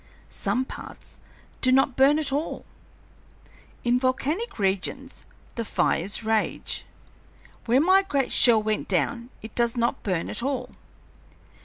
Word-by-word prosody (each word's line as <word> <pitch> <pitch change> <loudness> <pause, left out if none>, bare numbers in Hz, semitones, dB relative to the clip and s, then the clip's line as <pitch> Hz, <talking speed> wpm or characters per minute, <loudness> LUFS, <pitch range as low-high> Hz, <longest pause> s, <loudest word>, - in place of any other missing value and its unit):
Some 225 +6 -1
parts - - -11 0.4
do 255 - +4
not 265 0 +3
burn 275 +3 +5
at 295 -3 0
all. 295 +3 -3 1.2
In 245 +1 +2
volcanic 285 - -1
regions 200 +7 -2 0.3
the 230 - -3
fires 205 0 0
rage; 220 0 -1 0.8
where 245 +3 +3
my 375 +4 +5
great 280 -9 -1
shell 225 -3 +5
went 215 0 -1
down 200 - -1
it 220 - -9
does 235 0 +1
not 235 0 0
burn 180 -5 -2
at 210 - -3
all. 255 -1 -3
245 Hz, 130 wpm, -25 LUFS, 220-270 Hz, 1.2 s, burn